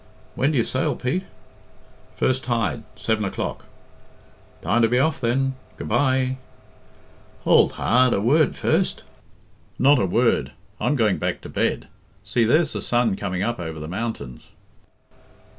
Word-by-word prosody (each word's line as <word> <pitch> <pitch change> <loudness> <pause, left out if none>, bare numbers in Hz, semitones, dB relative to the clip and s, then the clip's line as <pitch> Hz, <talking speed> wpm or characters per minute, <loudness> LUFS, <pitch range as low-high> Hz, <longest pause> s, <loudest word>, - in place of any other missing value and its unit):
"When 135 - +1
do 150 - 0
you 120 - +3
sail, 130 - -1
Pete?" 160 +10 -2 0.9
"First 130 0 0
tide 120 -1 -1
seven 110 0 -1
o'clock." 100 - -4 1.0
"Time 100 +9 +2
to 115 - +5
be 125 +2 +1
off, 140 +1 +1
then. 135 +3 +1 0.2
Good - - -6
bye!" 130 -1 +1 1.1
"Hould - - +4
hard 125 +2 +3
a - - 0
word 140 +8 +3
first." - - 0 0.7
"Not 140 +1 +5
a 95 - +1
word. 90 - +1 0.3
I'm 125 +6 +1
going 110 -7 +2
back - - -2
to - - -9
bed. - - -1 0.4
See, 115 +3 +1
there's 155 +9 +3
the - - -4
sun 120 -4 +1
coming 90 0 -3
up 120 -1 -2
over 80 -2 -5
the 75 - -6
mountains." 95 - -5
120 Hz, 145 wpm, -23 LUFS, 105-130 Hz, 1.1 s, to